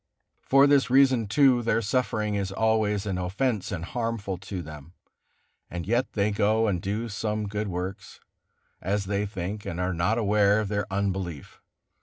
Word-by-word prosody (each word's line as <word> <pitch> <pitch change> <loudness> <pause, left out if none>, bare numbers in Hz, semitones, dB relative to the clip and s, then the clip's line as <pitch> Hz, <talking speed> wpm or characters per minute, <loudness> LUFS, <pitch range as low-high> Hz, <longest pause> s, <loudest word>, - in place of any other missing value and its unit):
For 135 +1 +5
this 140 -2 +4
reason, 130 -4 +4
too, 130 +2 +4
their 115 -1 +1
suffering 110 -2 -1
is 100 -1 -2
always 110 -1 +1
an 95 -3 -2
offence 105 +5 -1
and 85 -3 -4
harmful 115 -4 -3
to 95 -1 -6
them, 75 +1 -11 0.8
and 85 -1 -5
yet 120 +5 0
they 105 0 +1
go 110 +2 +2
and 95 -5 0
do 105 +5 -2
some 105 -1 -3
good 105 +1 -3
works, 95 +1 -5 0.6
as 100 +1 -1
they 100 +1 -1
think, 100 +1 -5
and 85 -5 -5
are 90 +1 0
not 85 +7 +1
aware 105 -1 +3
of 105 -2 -2
their 105 -1 -2
unbelief. 95 -6 -3
105 Hz, 165 wpm, -26 LUFS, 95-110 Hz, 0.8 s, For